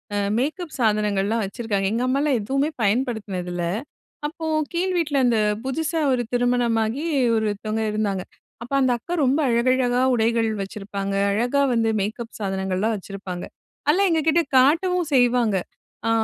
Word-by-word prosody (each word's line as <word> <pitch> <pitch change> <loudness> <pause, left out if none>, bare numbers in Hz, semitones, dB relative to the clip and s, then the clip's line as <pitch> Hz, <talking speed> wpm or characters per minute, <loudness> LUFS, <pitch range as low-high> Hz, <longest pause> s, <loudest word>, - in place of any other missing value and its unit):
A - - 0 0.2
makeup 310 +6 -2
சாதனங்கள்லாம் 210 -1 +1
வச்சிருக்காங்க. 200 -2 -2
எங்க 235 +3 0
அம்மா 265 +2 +1
எல்லாம் 290 -5 +2
எதுவுமே 275 +7 0
பயன்படுத்தினது 205 -5 -1
இல்ல. 175 - -2 0.6
அப்போ 320 +1 -7 0.3
கீழ் 365 +2 0
வீட்ல 305 -4 0
அந்த 235 -2 +3 0.3
புதிசா 320 +4 -1
ஒரு 245 - +1
திருமணமாகி 245 +1 +1 0.3
ஒருத்தவங்க 215 0 -1
இருந்தாங்க. 205 -3 -1 0.4
அப்ப 245 - -12
அந்த 255 - +3
அக்கா 340 +9 -6
ரொம்ப 270 +4 +2
அழகழகா 245 +1 +2
உடைகள் 230 -1 +2
வச்சிருப்பாங்க. 195 0 -5 0.2
அழகாக 245 +6 +2
வந்து 225 -1 +2
மேக்கப் 220 +3 -4
சாதனங்கள்லாம் 190 +2 -1
வச்சிருப்பாங்க. 190 -2 -7 0.4
அதலாம் 375 +5 +4
எங்ககிட்ட 320 +1 +3 0.2
காட்டவும் 340 +6 +3
செய்வாங்க. 245 -5 +3 0.5
ஆ, - - +2
235 Hz, 135 wpm, -23 LUFS, 210-275 Hz, 0.6 s, அதலாம்